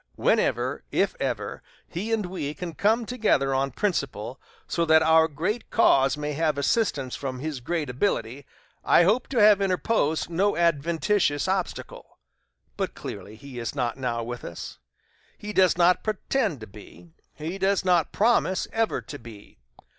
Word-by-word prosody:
Whenever, - - +1
if - - +1
ever, - - -3 0.3
he 200 +7 -4
and 220 -3 0
we 155 -5 -4
can 170 +1 -6
come 220 +7 +1
together 210 - +1
on 135 +1 +1
principle 135 - -3 0.3
so 170 - 0
that 160 -1 +5
our 160 0 +5
great 180 +10 -3
cause 135 -10 +4
may 150 0 -3
have 155 -1 0
assistance 140 - 0
from 130 -2 -5
his 145 0 -4
great 155 +4 -2
ability, 130 - -2 0.4
I - - +5
hope 215 +8 +2
to 265 - -4
have 210 -1 +6
interposed 185 -4 0
no 190 +5 +1
adventitious 170 0 +1
obstacle. 190 -1 -4 0.6
But, - - -3
clearly, 100 +2 -8
he 130 +1 -9
is 115 +3 -4
not 120 -4 -1
now 120 -3 -2
with 120 +1 -6
us 85 - -8 0.6
he 210 0 -7
does 185 -3 +4
not 180 0 +4
pretend 215 - -1
to 110 - -8
be 105 - -15 0.2
he 165 +5 -5
does 195 0 +1
not 175 -4 +3
promise 215 -4 +2
ever 225 0 0
to 145 - -9
be. 110 - -14
160 Hz, 155 wpm, -25 LUFS, 135-195 Hz, 0.6 s, have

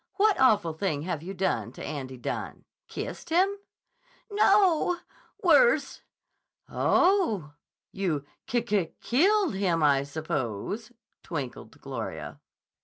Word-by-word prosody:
"What 420 0 +3
awful 210 -10 +4
thing 155 -3 -2
have 165 -3 -3
you 190 +4 -7
done 190 +1 -1
to - - -9
Andy 130 -3 -5
Dunne? 120 - -5 0.2
Kissed - - -6
him?" 375 +5 +3 0.8
"No! 390 -4 +4 0.5
Worse." - - +4 0.7
"Oh! 285 - +2 0.4
You 170 -8 -2 0.2
ki 240 -1 0
ki 205 -7 0
killed 380 - +3
him, 180 -5 +1
I 140 -2 +4
suppose," 150 - -4 0.3
twinkled 140 -5 -6
Gloria. 80 - -6
190 Hz, 110 wpm, -27 LUFS, -, 0.8 s, awful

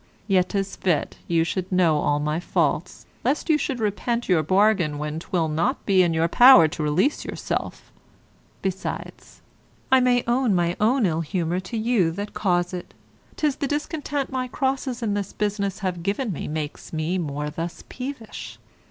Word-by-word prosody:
Yet 185 -3 +3
'tis 195 -1 -2
fit 175 -5 0
you 165 -1 +2
should 185 +2 -3
know 170 -5 +3
all 145 0 +1
my 150 +2 -1
faults, 175 -1 -1 0.2
lest 285 +6 +1
you 305 - +5
should 270 -3 -2
repent 235 +3 -1
your 180 -4 +3
bargain 185 -3 +2
when 150 +1 -3
'twill 170 -1 -1
not 160 +2 -1
be 190 -2 +4
in 175 -2 +3
your 165 0 +2
power 240 -4 +8
to 155 - -5
release 160 - +1
yourself; - - -4 0.7
besides, 190 -1 -5 0.5
I 265 - +7
may 250 -1 +3
own 240 -3 +2
my 175 0 +1
ill 210 -8 +2
humour 175 +1 -1
to 190 +5 -5
you 220 -6 +2
that 205 +4 -5
cause 175 -2 0
it; 180 - -7 0.4
'tis 295 -3 0
the 280 - -1
discontent 295 -1 -2
my 255 -1 -2
crosses 265 -1 -2
in 210 -3 0
this 200 -1 -3
business 200 -2 -1
have 180 -2 -2
given 200 +4 -1
me - - -5
makes 150 -1 -5
me 165 +3 -1
thus 150 +2 -4
peevish. 255 -4 -7
190 Hz, 165 wpm, -24 LUFS, 165-240 Hz, 0.7 s, power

